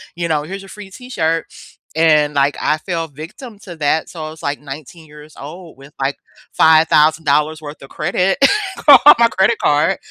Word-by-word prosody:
you 170 0 -3
know, 155 -2 -1
here's 195 +6 -8
your 195 - -14
free 210 -1 -11
t-shirt," 165 -9 -3 0.5
and, 155 -2 +2
like, 140 0 0
I 155 - 0
fell 165 -1 -4
victim 200 - -12
to 180 -4 -11
that, 155 +1 -1
so 165 -3 -8
I - - -6
was 155 0 -13
like 145 0 -3
19 150 +3 -11
years-old 150 +3 -13
with, 140 +2 -16
like, 135 +1 -2 0.3
$5000 155 -1 +2
worth 150 0 -10
of 135 - -13
credit 180 +4 -1 0.4
car 285 -2 +7
on 295 - +9
my 235 - +5
credit 205 +2 +1
card 150 +6 +1
160 Hz, 180 wpm, -17 LUFS, 150-185 Hz, 0.5 s, on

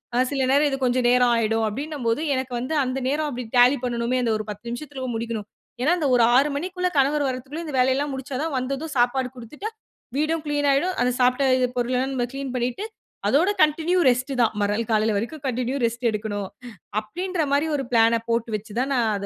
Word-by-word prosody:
அ - - +2
சில 270 -2 +1
நேரம் 290 +2 +4
இது 270 - -2
கொஞ்சம் 245 0 +2
நேரம் 250 0 +4
ஆயிடும் 225 0 +1
அப்பிடீன்னம்போது 270 +1 -2
எனக்கு 260 -1 -3
வந்து 255 +6 -3
அந்த 255 +1 -2
நேரம் 300 +2 0
அப்பிடி 250 -2 -5
ஜாலி 250 +3 +6
பண்ணணுமே 240 +1 0
அந்த 230 -2 +1
ஒரு 215 - -4
10 210 +3 -11
நிமிஷத்துல 265 +1 -6
முடிக்கணும். 225 -2 -4 0.3
ஏன்னா, 290 +6 +3
அந்த 300 - +1
ஒரு 240 - +5
6:00 275 +3 +4
மணிக்குள்ள 360 +3 -2
கணவர் 285 +1 +2
வர்றத்துக்குள்ள 265 +6 -5
இந்த 300 -4 -5
வேலையெல்லாம் 265 +3 +2
முடிசச்சா 265 0 -5
தான் 320 -3 -2
வந்ததும் 275 +4 -4
சாப்பாடு 250 +2 +2
குடுத்துட்டா, 260 - -7 0.5
வீடும் 310 +1 0
கிளீன் 290 -1 0
ஆயிடும். 350 +7 +1
அந்த 250 0 +2
சாப்பிட்ட 255 +2 +3
இத 250 - +2
பொருளெல்லாம் 250 +2 0
நம்ம 245 -2 0
கிளீன் 275 -2 -4
பண்ணிட்டு, 250 - -2 0.4
அதோட 330 +8 +3
கன்டின்யூ 320 +4 +3
ரெஸ்ட் 255 +2 0
தான் 225 -2 +2
மறுநாள் 210 +3 0
காலையில 215 0 +2
வரைக்கும் 240 +9 -4
கன்டின்யூ 255 +1 -1
ரெஸ்ட் 235 +2 -3
எடுக்கணும். 205 -2 -3 0.5
அப்பிடின்றமாரி 305 - -1
ஒரு 270 - -2
பிளான 230 0 +4
போட்டு 230 0 0
வச்சு 210 0 -7
தான், 265 +2 0
நான் 235 -3 +2
அத 200 - -5
255 Hz, 195 wpm, -24 LUFS, 235-290 Hz, 0.5 s, ஜாலி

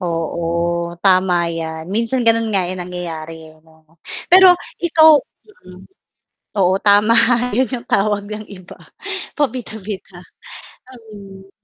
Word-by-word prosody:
Oo, 170 0 -3
tama 185 -3 +2
'yan. 160 +1 -6
Minsan 230 +4 -1
ganun 230 -2 +1
nga, 190 - +2
eh, 185 - -6
nangyayari, 165 -3 -8
eh, 155 - -21
'no. 160 0 -27 0.3
Pero 370 0 +8 0.3
ikaw 320 -2 +5 0.6
mm. 180 0 -14 0.7
Oo, 190 -2 +1
tama. 205 +2 +4 0.4
Yun 260 +3 +2
yung - - -16
tawag 205 0 0
ng 215 0 -7
iba, 185 -3 -12 0.6
pabida-bida. 220 -9 -5 1.0
Mm. 195 -1 -14
190 Hz, 115 wpm, -18 LUFS, 170-215 Hz, 1.0 s, Pero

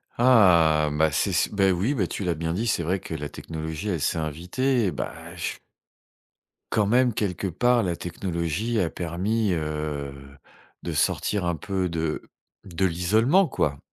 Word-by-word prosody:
Ah, 85 -11 +5
ben, 80 +1 +2
c'est - - +1
c'est - - +1
ben, 100 -2 +3
oui, 100 +11 0
ben, 100 -11 0
tu 100 - -4
l'as 90 - +1
bien 80 +1 -2
dit, 110 +7 -1
c'est 95 -5 +1
vrai 90 +4 0
que 85 - -8
la 75 -2 -4
technologie 80 +3 -5
elle 85 -6 -1
s'est 80 - 0
invitée, 90 - 0
ben, - - -4 0.2
je - - -4 1.1
Quand 105 - +2
même 120 +2 +3
quelque 100 -3 -2
part 120 +7 +2
la 90 -4 -1
technologie 90 +5 -2
a 85 - 0
permis, 95 +6 -1
heu, 70 -3 -4 0.5
de - - -3
sortir 100 -4 0
un 85 -1 0
peu 95 +3 -2
de 80 -2 -3 0.4
de 95 -1 -3
l'isolement, 110 - +3
quoi. 70 - -1
90 Hz, 165 wpm, -25 LUFS, 80-105 Hz, 1.1 s, Ah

